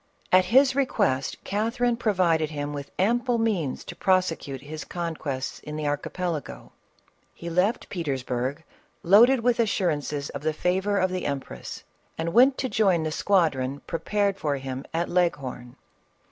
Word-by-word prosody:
At 185 0 +6
his 265 +7 +5
request, 135 - 0
Catherine 230 +4 0
provided 180 -9 +1
him 145 -1 -4
with 140 -1 -6
ample 240 +5 +2
means 200 - -1
to 175 - -8
prosecute 170 -8 0
his 155 +2 -7
conquests 155 -6 -4
in 150 - -8
the 155 0 -3
Archipelago. 145 - -3 0.6
He 170 0 -7
left 185 +7 +1
Petersburg, 135 -3 -3 0.4
loaded 230 +8 +6
with 245 0 +2
assurances 150 -9 0
of 140 - -6
the 155 +1 0
favor 190 +5 0
of 185 -1 +1
the 185 0 -2
empress, 140 -1 -6 0.3
and 165 +1 -2
went 260 +3 +6
to 260 - -1
join 195 -9 +2
the 155 - -2
squadron 145 -8 +1
prepared 200 +3 -1
for 145 -6 -1
him 135 0 -6
at 170 +1 -1
Leghorn. 135 -9 -1
170 Hz, 145 wpm, -26 LUFS, 145-205 Hz, 0.6 s, At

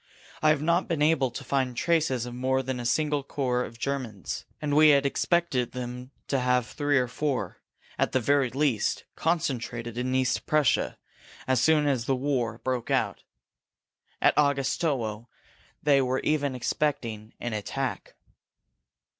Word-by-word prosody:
I 155 - +4
have 155 -1 +2
not 170 +3 +2
been 160 -3 0
able 150 -4 +3
to 135 - -7
find 130 -2 -1
traces 155 -7 +1
of 120 - -7
more 130 +1 0
than 130 -1 -3
a 120 - -2
single 150 +2 +1
corps 130 -3 -1
of 115 - -9
Germans 125 -7 -4
and 145 -1 -1
we 155 0 +7
had 140 -1 +5
expected 140 -3 +1
them 125 0 -6 0.2
to 135 - +1
have 125 -1 +2
three 145 +3 0
or 125 -1 +2
four, 140 +2 -3 0.4
at - - +2
the 130 - +2
very 140 +1 +2
least, 130 -3 0
concentrated 120 -7 -2
in 130 +1 -1
East 130 -1 0
Prussia 150 -5 +2 0.5
as 130 -2 +2
soon 155 -2 +4
as 130 -5 +1
the 135 - +1
war 125 -4 -1
broke 125 0 -3
out. - - 0 1.0
At - - +4
Augustowo 135 -5 0 0.6
they 140 -2 +5
were 130 0 0
even 145 -3 0
expecting 115 -5 -2
an 120 -2 -3
attack." 125 +5 -4
130 Hz, 155 wpm, -27 LUFS, 125-145 Hz, 1.0 s, we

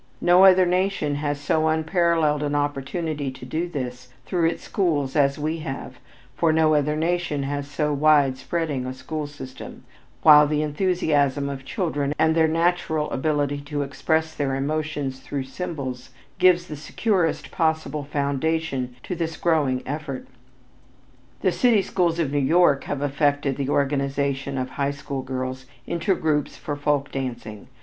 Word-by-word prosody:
No 180 +2 +6
other 185 -1 +7
nation 180 -4 0
has 145 -1 -2
so 155 +2 +1
unparalleled 160 -1 +2
an 145 0 -1
opportunity 145 +1 -2
to 130 -1 -9
do 160 +7 -2
this 125 -5 -5 0.2
through 170 -3 +1
its 170 - -6
schools 150 -8 0
as 140 -2 +3
we 155 +2 -2
have, 135 -3 -6 0.4
for 165 +2 +2
no 155 0 +3
other 150 0 +2
nation 165 -2 -1
has 140 +1 -3
so 150 0 -1
wide 145 -2 +4
spreading 140 -1 -2
a 130 - -5
school 150 +3 -5
system, 140 -3 -10 0.4
while 150 -1 +8
the 150 0 0
enthusiasm 150 -4 +1
of 135 -1 -6
children 145 - -2
and 160 0 +3
their 160 0 +4
natural 160 -2 0
ability 145 0 0
to 145 0 -3
express 160 +4 -1
their 135 -2 -1
emotions 145 -1 -2
through 140 0 -4
symbols, 135 -3 -5 0.3
gives 180 -1 +5
the 155 - -7
securest 165 +3 -1
possible 160 -3 0
foundation 140 -2 -1
to 180 - -4
this 165 -1 -3
growing 145 -7 +1
effort. 145 -1 -5 1.2
The 185 - +2
city 225 -1 +3
schools 175 -3 0
of 160 -5 0
New 145 - +1
York 145 0 +3
have 145 -1 -3
effected 145 -1 +1
the 140 0 -3
organization 140 -1 0
of 130 0 -3
high 140 -1 -1
school 140 -1 -5
girls 130 0 -5 0.2
into 170 +3 0
groups 150 -3 -1
for 145 - -4
folk 145 -1 0
dancing. 120 -6 -5
145 Hz, 155 wpm, -24 LUFS, 140-160 Hz, 1.2 s, while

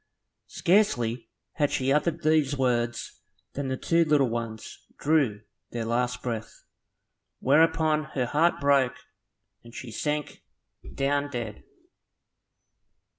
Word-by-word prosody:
Scarcely 120 - +1 0.2
had 145 -3 +1
she 130 +1 0
uttered 150 +2 0
these 155 -3 +2
words 120 -2 -1 0.3
than 140 -1 -3
the 130 0 -2
two 165 +4 +2
little 150 -5 +3
ones 115 -1 -6
drew 140 -9 +1 0.3
their 115 -1 -4
last 125 +2 -1
breath, 115 -3 -5 0.7
whereupon 155 +2 +3
her 130 -3 +1
heart 160 +7 +2
broke, 140 -3 +3 0.7
and 115 0 -14
she 125 - -7
sank 150 +5 -3 0.5
down 140 +1 0
dead. 120 -5 -5
135 Hz, 110 wpm, -27 LUFS, 120-150 Hz, 0.7 s, little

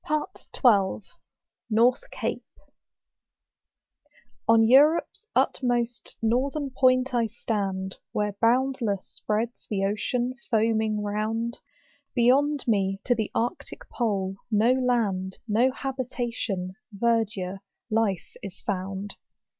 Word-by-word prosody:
I 305 - +1 0.4
LAPLAND. 205 -5 +3 1.1
21 - - -3 2.1
On 225 -1 +6
Europe's 300 - +4
utmost 240 -2 0
northern 270 +5 0
point 255 0 +3
I 235 -2 +2
stand, 195 -4 -3
Where 210 -1 -1
boundless 235 -4 +1
spreads 220 +3 -3
the 195 -2 0
ocean 240 +5 -1 0.2
foaming 220 -2 +1
round; 220 +3 -2 0.6
Beyond 275 +4 +3
me 195 -3 +1
to 250 - +4
the 220 -3 -2
arctic 235 +2 -3
pole, 195 -5 -1
no 220 +2 +4
land, 220 -8 0
No 230 +4 +3
habitation, 240 -8 -3 0.3
verdure, 210 -5 0 0.3
life, 215 -5 0
is 195 -3 -8
found. 195 0 -4
225 Hz, 95 wpm, -26 LUFS, 200-250 Hz, 2.1 s, On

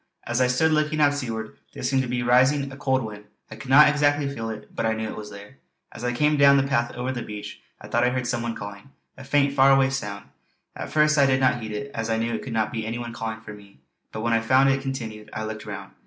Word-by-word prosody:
As 120 +2 -1
I 125 - +4
stood 145 +6 +2
looking 155 0 +1
out 145 -1 +4
seaward 115 -6 -5 0.2
there - - -7
seemed 135 -1 +2
to 130 - -3
be 125 0 -2
rising 130 +3 +3
a - - -9
cold 130 -2 0
wind; 105 -1 -8 0.3
I - - -7
could 110 +4 -10
not 150 +3 +8
exactly 145 -1 +2
feel 115 -5 -4
it, 110 -1 -9
but - - -2
I 110 0 +1
knew 110 0 -3
it - - -6
was 105 -1 -8
there. 100 +6 -12 0.3
As - - -10
I 125 - 0
came 150 +4 +2
down 140 0 +6
the 135 - +3
path 120 -4 0
over 125 +1 -3
the 125 -2 -4
beach 105 -2 -8 0.2
I - - -11
thought 120 +1 +1
I 125 - +4
heard 125 0 -2
some 120 -1 -1
one 115 -1 -3
calling 100 +4 -9 0.3
a 130 - -11
faint 140 +1 +2
far 135 0 +5
away 135 -1 +4
sound. 105 -7 -5 0.5
At - - -6
first 150 -1 +3
I 140 - +5
did 130 -1 +2
not 130 -2 +2
heed 110 -1 -6
it, 140 +7 -5
as 115 0 -3
I 110 - +1
knew 115 +1 -1
it - - -3
could 130 - -7
not 110 -1 0
be 115 -2 -3
any 115 +2 -4
one 120 -1 -6
calling 110 -1 -5
to 105 -2 -9
me; 100 -1 -16 0.3
but 110 - -5
when 115 +1 0
I 115 - +4
found 130 +4 +4
it 135 0 +1
continued, 115 -6 -6
I 110 - -4
looked 110 0 -7
round. 100 -1 -7
120 Hz, 280 wpm, -24 LUFS, 110-135 Hz, 0.5 s, not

